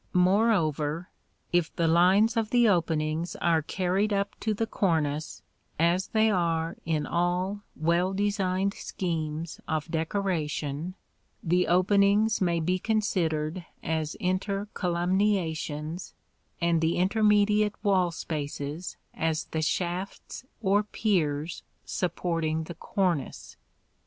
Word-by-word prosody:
Moreover, 180 -5 +2 0.4
if 175 -2 +1
the 170 - +1
lines 185 +7 +4
of 225 -2 0
the 240 -1 +4
openings 165 -3 0
are 165 -2 +2
carried 190 +6 0
up 200 0 0
to 220 - -1
the 215 +2 0
cornice 160 -8 -1 0.3
(as 170 +4 +2
they 220 0 +3
are 165 -3 0
in 155 -2 0
all 180 +5 0
well 170 +4 +1
designed 195 -1 0
schemes 160 -4 -4
of 160 0 -2
decoration), 160 -2 -2 0.5
the 180 +1 +2
openings 200 +4 +3
may 170 -2 +2
be 180 +3 0
considered 175 -6 0 0.2
as 160 -2 -2
intercolumniations 180 -4 -1 0.5
and 170 -1 +2
the 165 +1 +2
intermediate 210 +2 +3
wall 190 -4 +3
spaces 150 0 -5 0.2
as 160 -1 -1
the 160 - -1
shafts 180 +7 -3 0.2
or 200 +1 +4
piers 170 -8 -1 0.2
supporting 165 -3 -1
the 175 - -7
cornice. 175 -3 -2
175 Hz, 105 wpm, -28 LUFS, 160-200 Hz, 0.5 s, lines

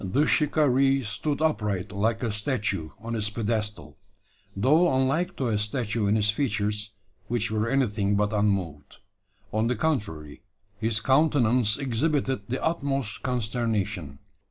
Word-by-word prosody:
The 130 +11 +1
shikaree 135 -3 +3
stood 140 +8 -2
upright 105 - 0
like 110 +4 0
a 115 - 0
statue 105 - -1
on 115 +1 -5
its 105 -2 -1
pedestal 105 -7 -3 0.6
though 155 - +4
unlike 160 +8 +1
to 135 - -2
a 105 -2 +1
statue 110 0 -1
in 105 - +3
his 105 -1 +2
features, 105 -3 -1 0.4
which 115 -1 -1
were 110 +1 0
anything 105 -7 +1
but 105 +1 +1
unmoved. 95 -8 -1 0.6
On 110 +2 +1
the 125 - +1
contrary, 100 - -2 0.4
his 110 0 0
countenance 130 -5 +3
exhibited 135 -3 -1
the 130 - -2
utmost 140 -8 -1
consternation. 105 - -2
110 Hz, 130 wpm, -26 LUFS, 105-135 Hz, 0.6 s, though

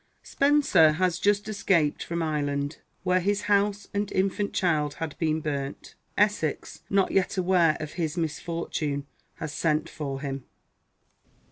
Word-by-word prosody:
[Spenser 275 - +4
has 180 +1 +1
just 205 +1 +2
escaped 185 -8 +1
from 170 0 -2
Ireland, 145 -1 -1 0.2
where 185 0 +3
his 205 +3 0
house 205 0 +1
and 205 0 -1
infant 195 +2 0
child 150 -5 +1
had 160 -3 -5
been 160 -1 +1
burnt. 140 -2 -4 0.2
Essex, 205 -7 0
not 195 -1 +2
yet 190 0 +1
aware 175 -3 +3
of 155 -1 -5
his 165 -1 -3
misfortune, 160 -3 -2 0.3
has 155 -2 -5
sent 155 -1 +1
for 140 -3 -5
him. 135 -2 -4
165 Hz, 135 wpm, -27 LUFS, 150-195 Hz, 0.3 s, Spenser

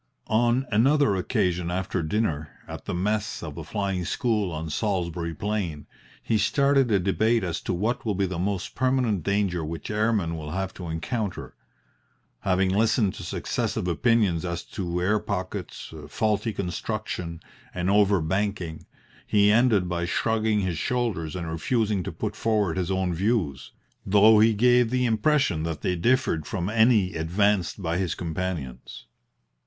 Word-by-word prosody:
On 120 +3 +3
another 125 +1 +4
occasion 90 -1 0
after 95 0 -2
dinner, 80 -4 -1 0.2
at - - -8
the - - -3
mess 105 +3 -1
of 75 -3 -5
the 85 - -7
Flying 95 +1 -2
School 105 0 0
on 80 0 -4
Salisbury 85 -4 -2
Plain, 100 -8 -3 0.4
he 110 - +1
started 135 +3 +3
a 100 - +5
debate 110 +4 +1
as 85 -3 -2
to - - -3
what 105 +7 -1
will 105 -3 -1
be 100 +1 +1
the 90 -2 -4
most 95 +1 -2
permanent 125 -7 +1
danger 100 -2 0
which 80 +5 -5
airmen 105 -6 +1
will 75 -2 -6
have 95 +3 -3
to 90 - -7
encounter. 95 +5 -3 0.9
Having 95 0 +1
listened 105 0 +2
to - - -9
successive 85 - -2
opinions 95 -2 +2
as 85 -1 -3
to 90 -3 -4
air 105 +4 +2
pockets, 100 -3 -5
faulty 110 +1 0
construction, 90 -3 -4 0.3
and 90 0 -3
over 100 0 +4
banking, 95 -1 -2 0.4
he 105 0 +4
ended 110 -5 +3
by 85 -1 -1
shrugging 110 +2 +1
his 90 -5 -2
shoulders 100 -8 -1
and 85 -2 -4
refusing 105 - 0
to - - -4
put 105 +6 -4
forward 105 -7 +1
his 90 -1 -1
own 95 -2 0
views, 85 - -1 0.3
though 105 +2 +6
he 110 0 +5
gave 120 +1 +4
the 125 +1 +1
impression 115 - +2
that 80 -2 -3
they 90 - 0
differed 85 - +1
from 95 +2 -2
any 110 -4 +4
advanced 95 +4 +1
by 85 +1 0
his 95 -3 -1
companions. 80 -9 -5
95 Hz, 155 wpm, -26 LUFS, 85-110 Hz, 0.9 s, though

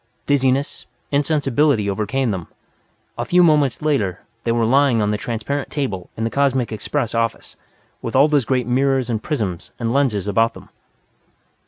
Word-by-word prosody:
Dizziness, 135 0 0 0.2
insensibility 145 -5 +2
overcame 110 +5 -1
them. 90 -4 -4 0.7
A - - 0
few 180 +9 +4
moments 150 -4 +3
later, 110 - 0 0.2
they 115 - +2
were 115 -1 +2
lying 135 0 +3
on 105 -1 +1
the 105 - 0
transparent 120 +6 -3
table 105 -12 -3
in 110 - -2
the 115 - -1
Cosmic 135 -4 +1
Express 115 +3 -2
office, 115 -1 -2 0.5
with 115 - -4
all 140 +3 +6
those 145 -5 +2
great 125 -1 0
mirrors 130 0 +1
and 110 -2 -1
prisms 105 - -3
and 115 -1 -2
lenses 125 -9 +1
about 115 +3 +2
them. - - -13
125 Hz, 160 wpm, -20 LUFS, 110-140 Hz, 0.7 s, all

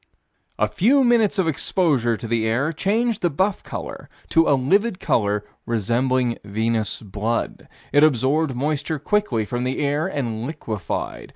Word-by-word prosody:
A 105 - +2
few 235 - +3
minutes 230 -4 +3
of 190 -3 +1
exposure 140 - +1
to 115 - -7
the 110 -1 0
air 130 +8 0
changed 220 +6 0
the 175 - +2
buff 190 +6 0
color - - -7 0.2
to 165 0 +4
"a 140 - +4
livid 195 - +1
color 105 -2 0 0.2
resembling 120 +2 0
venous 110 +2 -1
blood." 110 +3 -3 0.3
It 145 - +6
absorbed 140 +1 +2
moisture 150 +3 -1
quickly 150 - 0
from 120 +3 -3
the 130 +1 -2
air 145 +3 0
and 120 -8 -3
liquefied. 115 - -5
135 Hz, 150 wpm, -22 LUFS, 115-165 Hz, 0.3 s, It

